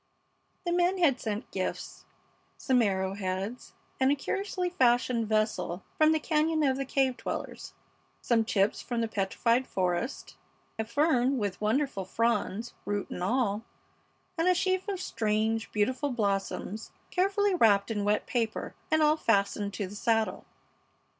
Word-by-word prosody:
The 345 - 0
men 355 +2 +2
had 290 -8 +3
sent 215 +1 -4
gifts: - - -4 0.5
some 255 -2 +2
arrow 190 -3 0
heads 195 +4 -4 0.3
and 265 +1 +4
a - - +3
curiously 370 +4 -2
fashioned 245 -7 +2
vessel 215 -4 0
from 310 0 +5
the 315 - +2
cañon 310 -1 +1
of 265 - +2
the 275 - -2
cave 265 -1 +1
dwellers; - - -6 0.4
some 230 -2 +2
chips 200 -2 +1
from 240 -1 -2
the 230 - 0
petrified 230 +4 0
forest; 185 +7 -2 0.4
a 220 - 0
fern 265 +1 +2
with 205 -4 -3
wonderful 220 -1 0
fronds, 230 +2 -1
root 205 -1 -3
and - - -5
all; 210 +1 +1 0.8
and 330 - +2
a 365 - +5
sheaf 375 +2 0
of 390 -2 -2
strange, 220 - -1
beautiful 255 +7 0
blossoms 205 -2 -2 0.2
carefully 395 +2 +2
wrapped 220 - +4
in 205 -2 -1
wet 210 +1 +1
paper, 230 -3 -2 0.2
and 315 0 +3
all 305 +1 +4
fastened 200 -5 +1
to 205 - -2
the 190 +2 -9
saddle. 225 0 0
230 Hz, 145 wpm, -29 LUFS, 205-290 Hz, 0.8 s, from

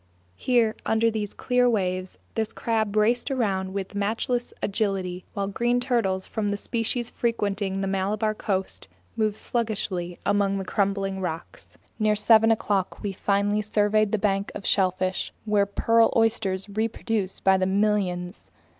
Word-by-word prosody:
Here, 230 - +2
under 225 +1 +2
these 210 -2 -3
clear 250 0 +2
waves, 185 -4 -1 0.2
this 220 -1 -1
crab 220 -3 -1
raced 235 +5 +2
around 195 -8 0
with 195 +1 -4
matchless 230 +4 -1
agility, 195 -3 -1
while 200 - -1
green 240 +4 +1
turtles 225 -7 0
from 215 -2 -2
the 205 - -1
species 235 +2 -2
frequenting 200 -4 -1
the 195 - -1
Malabar 205 +3 0
coast 190 -3 -3 0.3
moved 215 -2 0
sluggishly 195 -7 -2
among 200 -1 +2
the 190 - -4
crumbling 195 0 0
rocks. 165 -2 -6 0.2
Near 215 -1 +3
seven 220 +1 +5
o'clock 205 -4 0
we 205 - -1
finally 200 +2 +1
surveyed 210 0 +2
the 215 - +2
bank 195 -1 0
of 200 - -7
shellfish, 185 -1 +1
where 205 -2 +2
pearl 230 +3 +3
oysters 215 -4 +1
reproduce 215 -1 -2
by 190 0 +4
the 185 - +1
millions. 190 -2 0
205 Hz, 145 wpm, -25 LUFS, 195-225 Hz, 0.3 s, seven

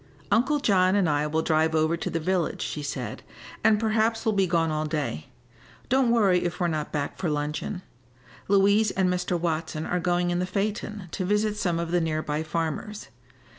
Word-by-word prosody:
"Uncle 270 +6 +3
John 190 -7 +3
and 195 -4 +3
I 150 0 +1
will 160 +1 0
drive 160 0 +2
over 155 +1 +2
to 170 - -4
the 165 - -2
village," 175 0 -1
she 150 - -4
said, 145 - -5 0.4
"and 215 -1 +4
perhaps 225 +1 +1
we'll 220 - +2
be 195 -2 +2
gone 165 -2 +1
all 155 0 -1
day. 140 - -3 0.6
Don't 260 -1 +3
worry 200 -6 +3
if 175 +1 -3
we're 180 - +1
not 155 -2 -2
back 145 -2 -3
for 175 - -1
luncheon. 150 +5 -3 0.6
Louise 200 +2 +4
and 190 -2 +1
Mr. 180 -1 -1
Watson 160 -2 -2
are 180 - -1
going 175 0 +1
in 175 - 0
the 180 - -1
phaeton 205 0 -3
to 185 - -3
visit 210 +2 +1
some 175 -5 0
of 170 0 -3
the 175 0 +2
near 155 -1 -1
by 150 +1 -2
farmers. 165 +6 -4
175 Hz, 195 wpm, -26 LUFS, 160-205 Hz, 0.6 s, and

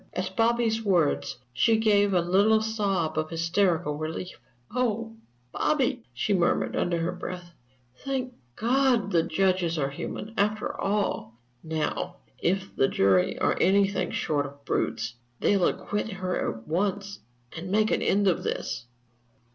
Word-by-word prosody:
At 185 +1 -3
Bobby's 225 0 +2
words 175 - +1 0.2
she 220 - +3
gave 205 -2 +3
a 180 -2 +3
little 200 +5 +4
sob 200 -8 0
of 155 0 -2
hysterical 165 -2 +1
relief. 160 +2 -5 0.3
"Oh, 230 -2 -1 0.4
Bobby," 270 -4 +1
she 125 - -1
murmured, 175 -3 +1
under 175 -1 0
her 165 +1 -1
breath, 180 -1 -7 0.5
"thank 260 -2 -2 0.2
God 245 -3 +2
that 170 -2 +2
judges 180 -1 +1
are 140 -2 0
human, 210 +9 -6
after 210 +1 0
all! 195 - -1 0.3
Now, 155 -2 -2 0.2
if 195 +2 -1
the 135 - +3
jury 95 -5 +2
are - - +2
anything 195 0 +3
short 145 -3 -1
of 140 0 -15
brutes, 115 +1 -1 0.3
they'll 195 -3 +3
acquit 210 +1 -2
her 185 -1 -2
at 110 0 -11
once 200 +4 -1 0.4
and 170 +3 -6
make 215 +2 +2
an - - +1
end 200 0 +2
of 180 - +2
this." 120 - -3
190 Hz, 140 wpm, -27 LUFS, 165-215 Hz, 0.5 s, little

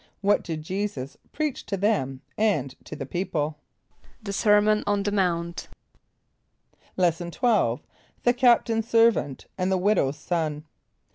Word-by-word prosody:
= - - -44
What 205 +1 +3
did 160 -3 -5
J[=e]´[s+]us 185 -7 -4 0.2
preach 305 -3 -2
to 200 - -2
them 135 -11 0
and 155 -12 +1
to - - -7
the 140 - -5
people? 155 -2 -2 0.6
=The 200 -2 -4
sermon 210 0 +4
on 205 -1 +1
the 205 - -1
mount.= 170 -3 -1 1.3
Lesson 175 -1 +1
XII. 210 - +1 0.4
The 245 - +4
Captain's 235 -3 +3
Servant 225 - +3
and 185 +1 +1
the 190 - +3
Widow's 180 -8 +1
Son. 155 -2 -2
190 Hz, 135 wpm, -25 LUFS, 155-210 Hz, 1.3 s, sermon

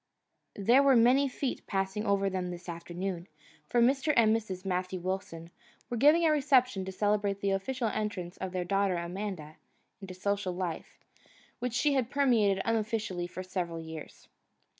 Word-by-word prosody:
There 235 +7 +4
were 275 -2 +5
many 250 +4 +5
feet 265 0 -4
passing 195 +2 -2
over 200 -1 +2
them 185 -2 -2
this 175 0 -8
afternoon, 175 +1 -5 0.4
for 245 - +1
Mr. 270 +5 +3
and 220 -1 +5
Mrs. 195 -4 -5
Matthew 185 0 -2
Wilson 175 -2 -5 0.4
were - - 0
giving 300 +7 +5
a 315 - +5
reception 260 -8 +3
to 190 - -5
celebrate 205 0 0
the 200 0 0
official 235 +6 -1
entrance 205 -5 -3
of 190 -1 -4
their 180 -1 -2
daughter 195 0 +1
Amanda 170 -3 -5 0.4
into 190 -1 -8
a - - -13
social 195 0 -1
life 175 -3 -5 0.6
which 250 -1 -3
she 290 +4 +2
had 255 -4 0
permeated 230 -9 +2
unofficially 215 -5 -1
for 185 +1 -7
several 180 -3 -3
years. 160 -1 -9
195 Hz, 160 wpm, -30 LUFS, 180-235 Hz, 0.6 s, were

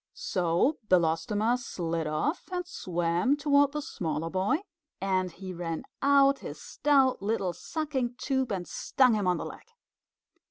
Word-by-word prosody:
So 180 - +1
Belostoma 185 +7 +2
slid 170 -8 -3
off 155 - -2
and 360 -1 -2
swam 175 - 0
toward 285 -1 +3
the 300 -1 -3
smaller 165 - -3
boy, 195 - +1 0.4
and 185 -2 0
he 185 +2 -8
ran 170 -2 -4 0.2
out 275 0 +5
his - - -8
stout 270 -5 +2
little 200 -3 -1
sucking 275 - -3
tube 265 -2 -1
and 185 -3 -3
stung 255 -3 +2
him 205 -3 0
on 180 -1 +2
the - - -4
leg. - - -10
205 Hz, 145 wpm, -29 LUFS, 175-275 Hz, 0.4 s, out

